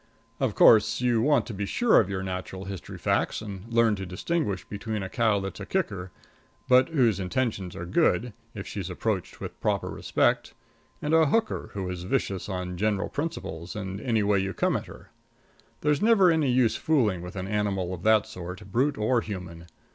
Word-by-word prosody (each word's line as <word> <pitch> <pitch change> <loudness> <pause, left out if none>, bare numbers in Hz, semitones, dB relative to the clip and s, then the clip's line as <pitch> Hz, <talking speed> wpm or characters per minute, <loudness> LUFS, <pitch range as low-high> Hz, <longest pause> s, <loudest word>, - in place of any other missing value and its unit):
Of 130 -6 0
course, 110 -2 +6
you 120 -2 +2
want 140 -3 +3
to 115 - -6
be 100 0 -3
sure 240 - +4
of 100 - +1
your 95 -1 -3
natural 95 0 -5
history 95 -5 -7
facts - - 0
and 105 +1 -8
learn 115 -2 +4
to 95 - -5
distinguish 100 - -2
between 105 0 -4
a 95 - -5
cow 110 -2 +2
that's 95 0 -6
a - - -6
kicker, 100 - -2 0.6
but 130 +2 +5
whose 125 - +2
intentions 100 -2 -2
are 85 - -5
good 125 - +1 0.2
if 95 - -6
she's 95 -3 -5
approached 95 0 -3
with - - -8
proper - - 0
respect, - - 0 0.5
and 150 +1 0
a 160 -1 +5
hooker, 225 +10 0
who 95 -2 -3
is 90 -1 -4
vicious 95 +1 -2
on 90 -2 -4
general 105 0 0
principles, 90 - -5
and 95 -1 -5
any 115 -3 +1
way 100 -1 +3
you 95 0 -2
come - - +1
at - - -3
her. - - -13 0.7
There's 150 -1 +1
never 210 -5 +5
any 155 -4 +2
use 125 -2 +3
fooling 115 - +1
with 90 +1 -8
an 95 -1 -4
animal 100 -3 -1
of 85 - -7
that 110 +1 +4
sort, 90 +2 -8
brute 135 +6 +1
or 115 +3 +2
human. 90 -5 -7
105 Hz, 190 wpm, -27 LUFS, 95-125 Hz, 0.7 s, course